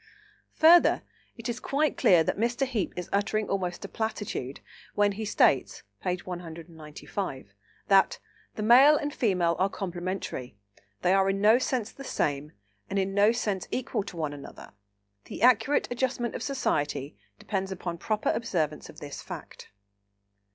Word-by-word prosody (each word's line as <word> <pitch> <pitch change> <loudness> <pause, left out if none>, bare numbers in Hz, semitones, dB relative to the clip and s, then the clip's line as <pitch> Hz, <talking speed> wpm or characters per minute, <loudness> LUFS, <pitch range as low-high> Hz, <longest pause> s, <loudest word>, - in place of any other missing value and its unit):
Further, 335 +2 +6 0.3
it 230 +1 -6
is 240 0 -3
quite 295 +3 0
clear 175 -3 +5
that - - -1
Mr. 240 +5 0
Heape 235 -7 -2
is 180 - -4
uttering 210 +1 0
almost 185 -1 -2
a - - -5
platitude, 205 - -4 0.4
when 205 0 +3
he 215 +2 -5
states 135 - +2 0.2
(p. 180 - 0
195) 165 - -7 0.3
that 195 -1 +4 0.4
"The 215 - -3
Male 265 +7 +7
and 290 0 -3
Female 180 -7 +1
are 190 +1 +2
complementary; 175 - -5 0.5
they 180 - +4
are 195 0 +3
in 195 0 0
no 215 +4 +5
sense 245 -4 -1
the 275 - -11
same, 145 - -2 0.4
and 195 - -2
in 195 0 0
no 205 +2 +5
sense 210 -6 -2
equal 255 - -2
to 175 - -9
one 155 -3 -2
another; 140 -1 -11 0.5
the - - -6
accurate 250 +3 +4
adjustment 245 -1 -1
of - - -5
society 145 - -1 0.2
depends 195 -3 -3
upon 175 -2 -5
proper 215 +1 -1
observance 160 -9 -2
of - - -13
this 145 -1 -7
fact." - - -10
195 Hz, 150 wpm, -28 LUFS, 170-230 Hz, 0.5 s, Male